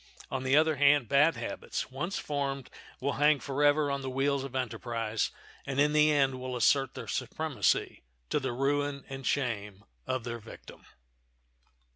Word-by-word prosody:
On 130 0 -2
the 130 +2 +3
other 155 -1 +3
hand, 140 -2 +5
bad 150 +7 +4
habits, - - -4
once 170 +9 -3
formed, 140 -2 -3 0.3
will 140 +2 0
hang 150 -1 +5
forever 145 +1 +2
on 140 0 -2
the 135 - -4
wheels 135 +1 0
of 135 -1 -7
enterprise, 115 -3 -2 0.3
and 135 0 -3
in 150 +1 +4
the 150 0 +5
end 135 -3 +2
will 130 0 -4
assert 135 +2 +2
their - - -6
supremacy, - - -1 0.3
to - - +2
the 130 -2 -2
ruin 140 +2 -1
and 135 -1 -5
shame 105 -7 -2 0.2
of 130 -2 -1
their 120 0 -5
victim. 110 - -13
135 Hz, 160 wpm, -30 LUFS, 130-145 Hz, 0.3 s, hand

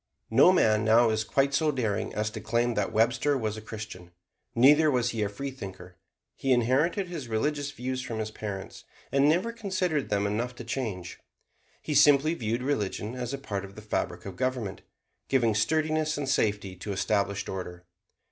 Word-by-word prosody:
No 135 +10 +7
man 110 -11 +3
now 115 +1 +5
is 110 0 0
quite 140 +4 +1
so 155 +2 +2
daring 115 -7 -1
as 105 0 -1
to 110 0 -7
claim 120 +1 +1
that 105 -3 -1
Webster 125 +6 +2
was 110 -4 -2
a 110 - -7
Christian. 105 -5 -8 0.5
Neither 145 +6 +6
was 125 -3 +1
he 115 - -3
a 105 - 0
freethinker. 100 -7 -7 0.4
He 135 -1 +1
inherited 135 - +2
his 165 -8 -6
religious 145 +6 -1
views 130 -2 -4
from 115 -3 -5
his 110 0 -3
parents, 100 -3 -6 0.3
and 140 +1 +4
never 180 +9 +2
considered 185 - -1
them 100 -1 +1
enough 115 +5 -2
to 120 - -8
change. 110 -8 -4 0.6
He 155 - -2
simply 145 +2 +5
viewed 120 -4 -2
religion 110 -4 -2
as 125 -1 -4
a 140 - -3
part 100 -8 -4
of 100 0 -10
the 110 - -9
fabric 105 - -3
of 95 -2 -7
government, 125 -6 -2 0.5
giving 120 -5 +3
sturdiness 155 +7 +1
and 145 -2 -3
safety 105 -7 0
to 100 +3 -5
established 100 +1 0
order. 90 -2 -6
120 Hz, 175 wpm, -28 LUFS, 105-140 Hz, 0.6 s, No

